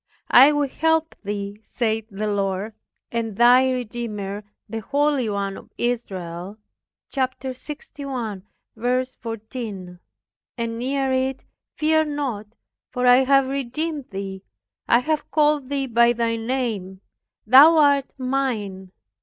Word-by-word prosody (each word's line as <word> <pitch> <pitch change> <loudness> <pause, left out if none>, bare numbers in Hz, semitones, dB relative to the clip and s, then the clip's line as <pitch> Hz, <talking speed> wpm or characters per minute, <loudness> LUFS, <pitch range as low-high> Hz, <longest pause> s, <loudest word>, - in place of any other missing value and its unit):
I 270 +4 +9
will 290 -1 +1
help 320 +3 +1
thee 205 0 -5
saith 220 -2 -2
the 210 +1 -4
Lord, 200 0 -1 0.4
and 225 -3 -3
thy 250 +2 +6
Redeemer, 215 -5 -4 0.2
the 225 +1 -4
holy 280 +1 +1
one 200 -1 -2
of - - -13
Israel." 190 -5 -3 0.5
(Chap. 260 -2 -1
61:14) 240 - -5 0.6
and 230 -1 -3
near 270 +1 0
it, 260 0 -1 0.3
"Fear 315 0 +2
not; 275 -8 -3 0.4
for 250 0 -2
I 245 0 +8
have 275 0 +4
redeemed 275 +2 -3
thee, 195 -1 -6 0.5
I 235 - +5
have 310 +3 -2
called 295 -3 +2
thee 280 -1 -1
by 235 -1 +4
thy 230 -1 0
name; 225 -6 -3 0.4
thou 285 +8 +8
art 285 -2 +4
mine. 235 -8 -2
240 Hz, 115 wpm, -23 LUFS, 210-275 Hz, 0.6 s, I